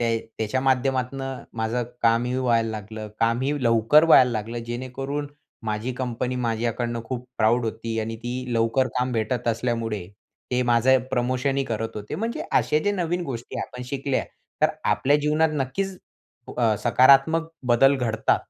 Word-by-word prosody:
ते 115 -1 +1 0.2
त्याच्या 110 +4 -1
माध्यमातनं 135 0 -1
माझं 115 +2 -1 0.2
कामही 120 +2 +2
व्हायला 115 -3 +1
लागलं. 110 0 -7
कामही 120 +5 +1
लवकर 115 +7 +5
व्हायला 130 -6 +7
लागलं. 115 +1 -3
जेणेकरून 130 +4 -4 0.4
माझी 110 +3 -2
कंपनी 125 0 -3
माझ्याकडनं 115 0 -1
खूप 125 +1 -5
प्राउड 115 +3 +3
होती 115 0 -3
आणि 115 +1 -4
ती 120 +2 -5 0.2
लवकर 115 +3 +2
काम 125 0 0
भेटत 115 +2 -1
असल्यामुळे, 115 -4 -1 0.4
ते 125 0 +1
माझं 120 +2 +4
प्रमोशनही 130 +2 0
करत 115 -2 -4
होते. 105 0 -6
म्हणजे 230 +3 -3
असे 150 - +3
जे 205 - +2
नवीन 175 -2 -1
गोष्टी 120 -4 -6
आपण 125 - -6
शिकल्या. 140 0 -1 0.4
तर - - +6 0.2
आपल्या 145 +2 +3
जीवनात 150 +2 +2
नक्कीच 185 +8 -3 0.6
अ, 115 -3 +3
सकारात्मक 135 +8 +5 0.2
बदल 130 +3 +5
घडता. 115 -4 +1
125 Hz, 145 wpm, -24 LUFS, 115-135 Hz, 0.6 s, व्हायला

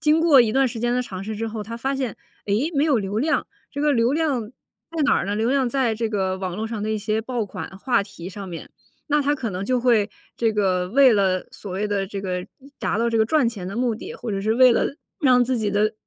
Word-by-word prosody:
经 305 +1 +4
过 320 -5 +6
一 230 -3 +3
段 270 +3 +3
时 230 -2 -5
间 240 0 +1
的 250 - +1
尝 190 -6 -7
试 215 +2 -5
之 225 +2 -2
后， 220 -1 -4
他 230 +3 -7
发 270 +4 -2
现：” 255 -6 -3 0.3
诶， 220 +11 +1
没 280 - +3
有 295 -5 +3
流 200 +1 -2
量。 305 +7 +1 0.2
“这 285 - -5
个 295 -1 +3
流 235 +1 +2
量 305 -6 +1
在 315 +6 -8
哪 280 - +4
儿 - - -1
呢？ 205 - -1
流 225 +3 +1
量 270 -2 +2
在 240 -3 +1
这 225 0 -1
个 190 -3 -1
网 185 -1 -4
络 220 +1 -2
上 220 -2 -4
的 215 - -2
一 220 - 0
些 215 +1 -1
爆 240 -1 -2
款 200 - -7
话 240 -2 +1
题 195 -4 -10
上 195 0 -8
面。 170 -2 -8 0.4
那 295 0 +3
他 290 +1 +2
可 245 -6 -4
能 180 0 -4
就 250 +3 +1
会 230 -4 +3 0.3
这 230 -1 +2
个 185 -3 +1
为 265 +3 +6
了 190 -3 +1
所 200 - -9
谓 200 +3 -1
的 200 -2 -1
这 195 0 -5
个 180 -2 -3 0.3
达 - - -1
到 235 +2 +1
这 225 - +1
个 220 - +3
赚 295 0 +3
钱 200 -6 -6
的 200 - -6
目 240 -1 +1
的， 380 - -8
或 245 - -6
者 195 -1 -2
是 215 +3 +1
为 255 0 +7
了 255 - 0 0.3
让 250 -4 +5
自 255 0 0
己 210 -2 0
的 215 +2 +2
225 Hz, 290 characters per minute, -23 LUFS, 205-255 Hz, 0.4 s, 为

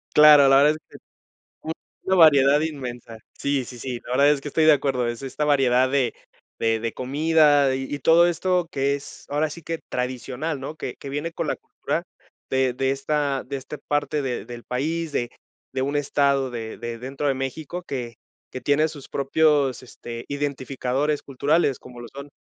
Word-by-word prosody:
Claro, 150 -2 +9
la 135 +1 +6
verdad 150 - +6
es 155 - -4
que - - -12 1.1
una 190 0 +1
variedad 145 -3 +6
inmensa. 125 -7 -5 0.2
Sí, 140 -2 0
sí, 125 0 -10
sí, 125 -1 -5
no, - - -7
la 125 - +1
verdad 145 +1 +6
es 140 - -5
que 145 - -5
estoy 160 +2 +2
de 155 - +8
acuerdo. 135 -4 0
Es 120 +2 -4
es - - -10
esta 135 +3 -2
variedad 130 -3 +3
de 135 -3 +1 0.5
de 115 -1 +1
de 115 0 -2
comida, 145 +1 +3
y 135 - -3
y 145 - -4
todo 165 +5 +5
esto 180 +1 0
que 140 0 0
es 140 - -11
ahora 150 +2 0
sí 170 +3 -9
que 165 0 -4
tradicional, 130 +4 -3
¿no? 140 +4 -6
Que 125 - -6
que - - -9
viene 145 +4 -3
con - - -3
la - - 0
cultura - - -4 0.5
de 130 -1 +1
de 135 +2 0
esta 140 0 -1
de 140 - -5
este 140 +2 -7
parte 145 +1 -1
de 130 -3 -3
del 120 0 -10
país, 155 +5 -2
de 120 0 -1 0.4
de 130 - -1
un 140 +2 -1
estado 140 -2 +1
de 115 -2 -6
de 120 -1 -6
dentro 135 +4 -4
de 135 - +1
México 145 +6 -4
que 125 -7 -5 0.4
que 130 - -5
tiene 150 +2 +2
sus 145 -3 -11
propios, 140 -1 +2
este, 120 -2 -9
identificadores 140 0 -2
culturales, 140 +1 +1
como 125 -1 -12
lo 120 - -8
son, 140 +1 -9
140 Hz, 195 wpm, -24 LUFS, 130-150 Hz, 1.1 s, Claro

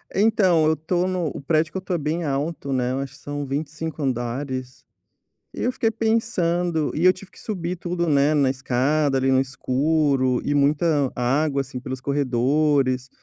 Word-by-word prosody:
Então, 195 -6 +3
eu 160 - +4
estou 175 +3 -1
no 180 -3 -1
o - - -6
prédio 155 +2 +1
que - - -3
eu - - -1
estou 185 -1 -3
é - - -1
bem 155 +3 -2
alto, 140 0 -2
né, 125 -1 0
eu 135 - -2
acho 135 -1 -5
que - - -15
são 145 0 -5
25 150 +3 -4
andares, 130 0 -3 0.7
e - - -6
eu 250 - +1
fiquei 225 -2 0
pensando 180 -8 0
e 165 - 0
eu 185 - +7
tive 185 0 -13
que - - -15
subir 180 -4 -4
tudo, 175 0 -2
né, 145 0 +3
na 140 -3 +3
escada 135 +2 +1
ali 135 0 +2
no 130 - +4
escuro 135 0 +1
e 145 - 0
muita 145 0 +2
água, 140 +3 +1
assim, 130 -1 -7
pelos 130 0 -6
corredores, 135 0 +1
145 Hz, 185 wpm, -23 LUFS, 135-170 Hz, 0.7 s, eu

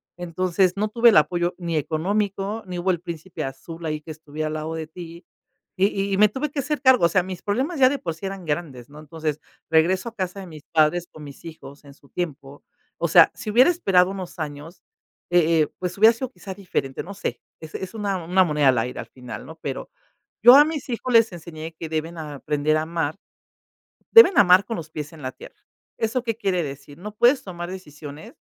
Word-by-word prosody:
Entonces, 180 +1 0
no 210 +1 0
tuve 235 +2 +5
el - - +5
apoyo 175 +3 +2
ni 170 -2 -3
económico, 195 +7 -1
ni 180 -1 -5
hubo 180 +2 +1
el 175 -3 -3
príncipe 170 0 -6
azul 160 +5 -8
ahí 155 -1 -2
que 155 - -9
estuviera 155 0 -5
al 155 - -4
lado 155 +1 -4
de 160 -1 -5
ti 170 +1 -11 0.5
y 195 +1 0
y - - +1
me 210 +1 +6
tuve 270 +7 -3
que 290 - -3
hacer 290 0 -2
cargo, 260 -8 +6
o 170 - +4
sea, 185 -3 +2
mis 185 -1 -7
problemas 260 - -2
ya 255 -1 +7
de 285 - -1
por 165 -8 -4
sí 160 +5 -6
eran 195 -2 -7
grandes, 145 -6 -4
¿no? 150 +1 -13
Entonces, 155 0 -4 0.3
regreso 185 +7 +2
a 230 - -22
casa 185 -1 -4
de 190 - -7
mis 155 -3 -11
padres 165 +2 +2
con 155 - -12
mis 140 -1 -12
hijos 150 -3 -11
en 140 -1 -15
su 140 - -24
tiempo. 145 -5 -6 0.4
O - - +1
sea, - - +7
si 215 - -7
hubiera 255 +10 +6
esperado 190 - +3
unos 185 -3 -7
años, 155 +2 -7 0.5
eh 165 -2 +4
eh, 150 - +2
pues 180 +1 -4
hubiera 220 +3 +7
sido 255 +2 -5
quizá 200 -6 -9
diferente, 180 -8 -3
no 200 +3 -9
sé, 205 - -4 0.2
es 160 -1 -11
es 190 +4 -6
una 200 -5 -2
una 185 +3 +3
moneda 150 -4 +1
al 130 - +3
aire 125 +2 -2
al - - -6
final, 125 -2 -9
¿no? - - -10
Pero - - -5 0.5
yo 245 +2 +10
a 290 - +9
mis 300 -3 -5
hijos 250 +1 -3
les 225 -2 +5
enseñé 165 -2 -8
que 165 - -5
deben 160 +2 -3
aprender 150 0 -1
a 155 - -1
amar, 160 -2 -2 1.0
deben 455 -5 +9
amar 185 0 +6
con 225 +4 -4
los 160 -2 -8
pies 150 0 -6
en 155 -3 -13
la 130 - -3
tierra. - - -14 0.4
¿Eso 230 +3 -1
qué 230 -2 -1
quiere 190 -6 0
decir? 140 +1 -9
No 210 +3 -8
puedes 245 +5 +3
tomar 175 -2 -6
decisiones 150 -4 -10
175 Hz, 220 wpm, -23 LUFS, 155-200 Hz, 1.0 s, yo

